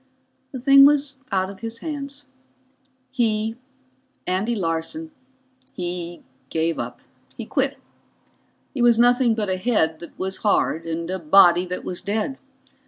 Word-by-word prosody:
The 260 - -6
thing 275 +2 +7
was 280 -1 +3
out 190 0 0
of 195 - -13
his 225 0 -6
hands. 285 0 -6 0.9
He 225 -3 0 0.7
Andy 195 +6 0
Larson 185 - -3 0.6
he 175 -1 -5 0.3
gave 165 0 -1
up. - - -6 0.4
He - - -5
quit. - - -1 1.0
He 270 - -3
was 240 -1 +5
nothing 245 0 +4
but 215 -2 -2
a 185 0 -1
head 185 -7 +1
that 170 - -12
was 190 0 -3
hard 165 -5 0
and 165 0 -3
a 190 - -3
body 175 +2 +5
that 180 +1 -5
was 180 - -4
dead. 220 +7 -2
210 Hz, 140 wpm, -23 LUFS, 175-250 Hz, 1.0 s, thing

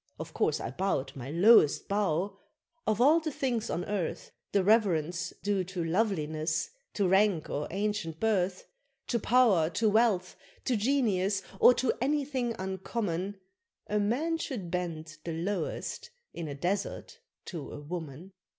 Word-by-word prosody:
Of - - -7
course - - +1
I 115 - -4
bowed 145 -4 -1
my 130 -1 -7
lowest 170 -1 +5
bow 195 -1 0 0.5
of 215 0 +1
all 295 +7 +6
the 320 -1 -3
things 245 -5 -1
on 175 - -2
earth, 200 -5 -3 0.2
The 200 - +3
reverence 180 -6 +2
due 200 -2 +1
to 180 -1 -4
loveliness, 160 - 0 0.2
to 200 -3 +2
rank, 190 -3 +3
or 145 +1 -2
ancient 195 -5 -2
birth, 190 -4 0 0.4
To 235 - +1
pow'r, 215 -9 +4
to 225 -2 +3
wealth, 205 -5 +2 0.3
to 255 - +2
genius, 205 -5 +1 0.2
or 250 - +8
to 255 - +1
anything 265 -4 0
uncommon, 190 0 -3 0.5
A 210 +1 0
man 290 +11 0
should 205 - -4
bend 160 -3 -4
the 165 - -4
lowest 190 - -3 0.2
in 170 -2 -5
a 145 - -5
Desert 190 +7 -3 0.3
to 165 -6 -6
a - - -7
Woman! 160 +2 -7
195 Hz, 145 wpm, -30 LUFS, 170-225 Hz, 0.5 s, or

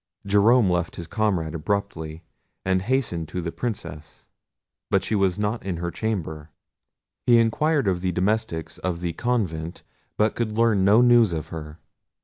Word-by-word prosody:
Jerome 105 +3 +4
left 90 -2 0
his 85 - -6
comrade 90 -6 -1
abruptly, 80 -2 -3 0.4
and 95 0 +2
hastened 105 - -1
to 90 - -5
the 85 -1 -3
Princess, 85 -11 -6 0.6
but - - +2
she - - -2
was 95 -3 +2
not 105 +2 -1
in 95 -3 -3
her 85 +1 -3
chamber. 80 -6 -3 0.8
He 120 -1 +7
inquired 140 +4 +2
of 90 -2 +1
the 90 0 0
domestics 95 -2 -1
of 85 -2 -3
the 85 -1 -2
convent, 90 -10 -2 0.3
but 105 0 +2
could 110 -2 -3
learn 115 -4 +3
no 105 +5 +6
news 120 -6 +5
of 80 -2 -4
her. 75 -1 -7
95 Hz, 155 wpm, -24 LUFS, 85-110 Hz, 0.8 s, He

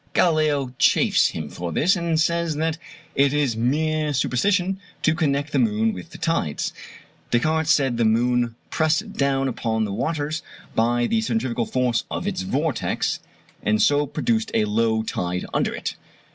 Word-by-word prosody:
Galileo 150 -6 +2
chaffs - - +4
him 80 -2 -5
for 85 +3 -5
this, 175 - +3
and 170 -3 0
says 170 -1 +1
that 160 +1 -1 0.3
it 140 0 +3
is 145 -6 +1
mere 150 +5 0
superstition 185 +9 +1 0.2
to 155 - +4
connect 145 -3 0
the - - +1
moon 225 -1 +2
with 170 - -9
the - - -11
tides. 85 - -1 0.6
Descartes 155 +6 +1
said 135 -7 +3
the 120 - +2
moon 120 +1 +2 0.2
pressed 170 +7 +1
down 135 -1 +1
upon 110 -3 -1
the 100 - -4
waters 155 +6 -2 0.3
by 120 +1 +2
the 225 - +1
centrifugal 130 - -1
force 125 -2 +1
of - - -4
its 195 -2 -2
vortex, 160 -7 -1 0.4
and 105 0 +1
so 145 +3 +3
produced 225 - 0
a 110 - +3
low 110 +1 +1
tide 90 -4 -3
under - - +1
it. - - -4
145 Hz, 160 wpm, -23 LUFS, 120-165 Hz, 0.6 s, chaffs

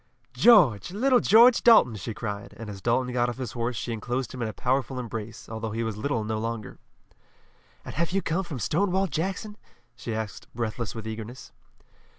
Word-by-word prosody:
"George! 175 - +5
Little 250 +6 +3
George 235 +3 +6
Dalton!" 220 - +6
she 105 +2 -6
cried, 105 -2 -6
and 110 -2 -7
as 95 -1 -9
Dalton 125 +3 0
got 120 0 +1
off 120 - -6
his 125 -4 -5
horse 120 +1 -2
she 115 +2 -3
enclosed 120 +4 -3
him 125 - -6
in 115 - -1
a - - -3
powerful 130 +3 -1
embrace, 115 -2 -6
although 110 0 -5
he 115 +2 -2
was 110 -2 -3
little 115 +1 -2
no 110 0 -2
longer. 115 -1 -5 1.1
"And - - -7
have 170 +2 -1
you 195 +1 0
come 175 +4 -1
from 160 -6 -6
Stonewall 190 - +1
Jackson?" 195 +6 -3 0.4
she 115 -3 -5
asked 110 -2 -6
breathless 115 -1 -3
with 110 -1 -6
eagerness. 110 +3 -7
120 Hz, 185 wpm, -26 LUFS, 110-160 Hz, 1.1 s, George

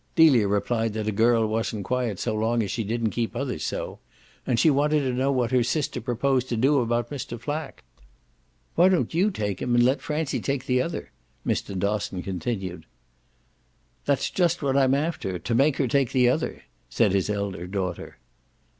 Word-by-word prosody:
Delia 135 -10 +6
replied 110 +2 0
that 110 -1 -3
a - - +1
girl 115 +2 +3
wasn't 110 -2 -2
quiet 125 -3 -1
so 110 - -2
long 115 +2 +1
as 100 - -3
she 115 - -2
didn't 115 +1 -1
keep 115 0 -2
others 125 - -3
so; - - -4 0.5
and 120 -3 +2
she 155 +5 +5
wanted 150 +2 +2
to 130 -2 -1
know 130 +2 +1
what 125 -3 0
her 130 -1 +4
sister 135 +5 -1
proposed 130 +2 0
to 120 - -1
do 135 +5 +3
about 120 0 -1
Mr. 125 -4 -5
Flack. 145 +5 -5 0.9
"Why 180 +2 +5
don't 185 -3 +1
you 185 +6 +3
take 105 - -3
him 120 - +1
and 120 - +5
let 130 +3 +2
Francie 150 -1 -2
take 140 -2 -2
the 125 0 +2
other?" 165 - -4 0.3
Mr. 100 - -2
Dosson 100 -2 -1
continued. 95 -1 -4 1.2
"That's 140 -2 +1
just 175 -3 +1
what 135 -1 +1
I'm 135 -1 +4
after 140 - -2
to 115 - -3
make 135 +4 +3
her 135 - +1
take 135 0 +1
the 125 -2 +4
other," 125 - -2 0.3
said 105 - +2
his 95 0 +1
elder 100 -4 -3
daughter. 90 -2 -4
120 Hz, 185 wpm, -25 LUFS, 105-140 Hz, 1.2 s, Delia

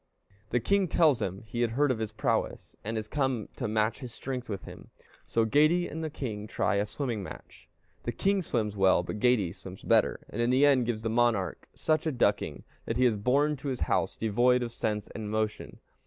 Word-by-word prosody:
The 125 - +2
king 200 - +2
tells 150 -7 +3
him 95 0 -3
he 120 +2 -4
has 120 - +2
heard 140 +4 +2
of 120 - -1
his 110 -1 -3
prowess, 110 - -2
and 110 +2 -3
is 110 -1 -3
come 130 -5 -1
to 125 - -2
match 110 +1 0
his 125 -4 -7
strength 125 0 -5
with 100 -3 -4
him. - - -11 0.4
So 115 -1 +2
Geyti 155 +9 +3
and 160 +2 -4
the 160 - -2
king 110 -8 -5
try 105 -1 0
a 100 +1 0
swimming 120 -2 -3
match. 95 - -11 0.3
The - - -2
king 195 0 +1
swims 110 - -1
well; 95 -2 +4
but 105 +4 -5
Geyti 110 -7 +3
swims 95 -1 -11
better, - - +3
and 120 - -2
in 120 - +2
the 130 +3 +5
end 130 -4 +4
gives 110 -2 -2
the 115 - -1
monarch 115 -6 +1
such 155 0 +1
a - - +1
ducking, 125 - 0 0.2
that 115 - -2
he 130 - +4
is 120 -3 +4
borne 140 +8 +2
to 135 - -7
his 130 -2 -3
house - - +1
devoid 120 +3 +2
of 120 - -4
sense 105 -3 -2
and 110 -2 -6
motion. 110 0 -2
120 Hz, 215 wpm, -29 LUFS, 105-135 Hz, 0.4 s, the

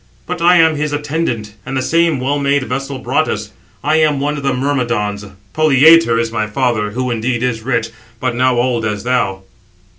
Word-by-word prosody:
But 180 -1 -5
I 175 +1 +5
am 160 -2 +4
his 150 0 -2
attendant, 145 -8 -3
and 135 +1 -4
the - - 0
same 165 -2 +2
well 140 +3 -1
made 140 0 +1
vessel 135 +1 -4
brought - - 0
us. - - -4 0.3
I 155 +2 +2
am 155 -3 +2
[one] 145 +2 -1
of 145 - -5
the 140 0 0
Myrmidons; 120 -6 -1 0.3
Polyetor 155 -3 +5
is 115 -1 -1
my 110 -2 -2
father, 110 -2 -1
who, 125 +3 -3
indeed, 120 +1 -1
is 115 -3 -1
rich, 115 -2 -1 0.3
but 130 -1 -1
now 130 0 +2
old 120 -1 0
as 105 -1 -3
thou. 100 -7 -1
130 Hz, 190 wpm, -16 LUFS, 115-145 Hz, 0.3 s, I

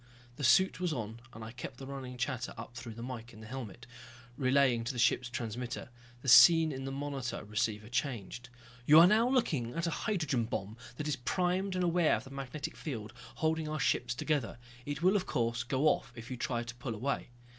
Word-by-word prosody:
The 145 - -5
suit 190 +10 +4
was 180 -2 0
on, 115 -4 -4
and 115 -1 -9
I 110 - -7
kept 125 0 -8
the 135 - -8
running 130 -2 -7
chatter 125 0 -3
up 115 +2 -8
through 115 -2 -8
the 115 - -7
mike 120 -2 -7
in 110 - -13
the 110 - -10
helmet, 120 -1 -7 0.5
relaying 130 -2 +3
to 130 - -2
the - - -7
ship's 125 +1 +2
transmitter. 120 +3 -5 0.3
The - - -7
scene 165 +4 +8
in 135 -1 -5
the 135 - -3
monitor 135 -3 -4
receiver 105 0 -2
changed. 120 -1 -3 0.4
"You 150 +2 +9
are 170 - +10
now 220 +6 +4
looking 150 - 0
at 170 +1 -1
a 170 - 0
hydrogen 155 - 0
bomb 105 -1 -4 0.2
that 150 - -3
is 145 -2 0
primed 185 +7 0
and 180 - 0
aware 175 -2 +3
of - - -5
the 135 - -12
magnetic 140 +3 -5
field 110 -8 -6 0.2
holding 160 0 0
our 155 0 -3
ships 120 -1 +1
together. 140 -5 -1 0.3
It 145 +2 -4
will, 185 +3 +5
of 190 -3 0
course, 115 -1 0
go 130 +4 -1
off 135 -4 +2
if 115 +1 -9
you - - -2
try 120 -1 -2
to 120 0 -7
pull 120 -2 -4
away." 130 +4 -2
130 Hz, 210 wpm, -32 LUFS, 120-155 Hz, 0.5 s, are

